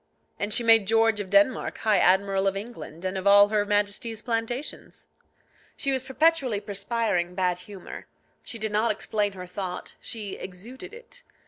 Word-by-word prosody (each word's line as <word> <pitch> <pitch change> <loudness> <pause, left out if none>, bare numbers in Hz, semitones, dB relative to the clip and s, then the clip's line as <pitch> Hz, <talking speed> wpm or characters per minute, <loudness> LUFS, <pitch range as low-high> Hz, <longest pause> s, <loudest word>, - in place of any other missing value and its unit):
And 205 +1 -2
she 235 - +2
made 225 -3 +6
George 225 0 +3
of 200 -2 -5
Denmark 200 +5 +2
High 215 -3 +2
Admiral 195 +1 +3
of 195 0 0
England 190 -6 -8
and 185 +1 -2
of 190 - -2
all 205 0 +7
her 210 -1 +1
Majesty's 210 +2 -1
plantations. 240 +4 -4 0.7
She 275 - -1
was 265 -1 0
perpetually 265 -3 +1
perspiring 200 -3 -2
bad 180 -1 0
humour; 190 0 -10 0.3
she 230 - -8
did 220 -1 -3
not 215 +2 +2
explain 210 -1 -1
her 180 -1 -8
thought, 180 0 -6
she 210 -4 -5
exuded 240 - -9
it. 485 +2 -13
210 Hz, 160 wpm, -26 LUFS, 195-230 Hz, 0.7 s, all